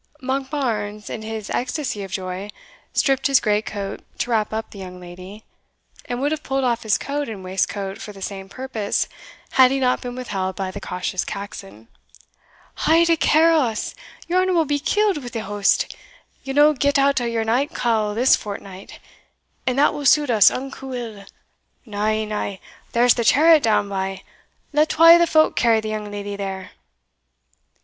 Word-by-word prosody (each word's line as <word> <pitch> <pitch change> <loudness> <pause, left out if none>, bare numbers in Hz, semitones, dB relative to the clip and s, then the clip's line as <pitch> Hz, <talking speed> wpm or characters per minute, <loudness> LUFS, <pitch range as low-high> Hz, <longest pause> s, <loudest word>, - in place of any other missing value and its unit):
Monkbarns, 260 -6 -3
in 220 - -5
his 220 -1 -6
ecstasy 250 -4 -2
of 195 - -6
joy, 190 +1 -4 0.4
stripped 270 -2 +2
his 275 -2 +5
great 210 0 0
coat 200 -2 -5 0.2
to 240 - -2
wrap 215 -2 +1
up 220 +1 -4
the 200 - -11
young 180 -1 -8
lady, 185 +4 -11 0.6
and 245 - -4
would 285 +3 0
have 315 - -2
pulled 270 0 -1
off 240 -2 +1
his 215 -2 +2
coat 285 -1 -3
and 200 -4 -7
waistcoat 195 +1 -2
for 210 - -7
the 200 - -13
same 195 0 -6
purpose, 235 -4 -2 0.4
had 260 -1 +6
he 270 +1 0
not 250 -1 +1
been 245 0 -6
withheld 190 -7 -3
by 190 -1 -3
the - - -8
cautious 180 0 -3
Caxon. 110 - -8 0.9
"Haud 335 +1 +3
a - - +5
care 320 +1 +4
o' 320 - +4
us! 230 -6 -2 0.3
your 360 +2 +2
honour 370 0 +1
will 330 -2 +3
be 290 0 0
killed 405 +3 +1
wi' 245 - -7
the 235 -3 -4
hoast 205 0 +1 0.5
ye'll 270 -1 -5
no 295 +1 +6
get 285 +1 +1
out 275 -1 +3
o'your 230 -1 -1
night 250 +6 0
cowl 215 -3 0
this 250 +4 +5
fortnight 200 -2 -8 0.7
and 255 0 +1
that 290 - +4
will 290 -2 -1
suit 295 -3 +4
us 215 -3 +7
unco 270 0 -6
ill. 220 -5 -7 0.6
Na, 210 -1 -1
na 210 -2 -3 0.4
there's 240 +1 +5
the 235 - -1
chariot 310 +6 +6
down 215 -4 +2
by; 195 -1 -4 0.5
let 300 +2 +3
twa 330 +1 +8
o' - - +8
the 340 - +4
folk 310 -1 +3
carry 230 -1 +3
the 215 0 -4
young 215 -1 -4
leddy 205 0 -5
there." 195 -2 -5
230 Hz, 180 wpm, -22 LUFS, 200-275 Hz, 0.9 s, twa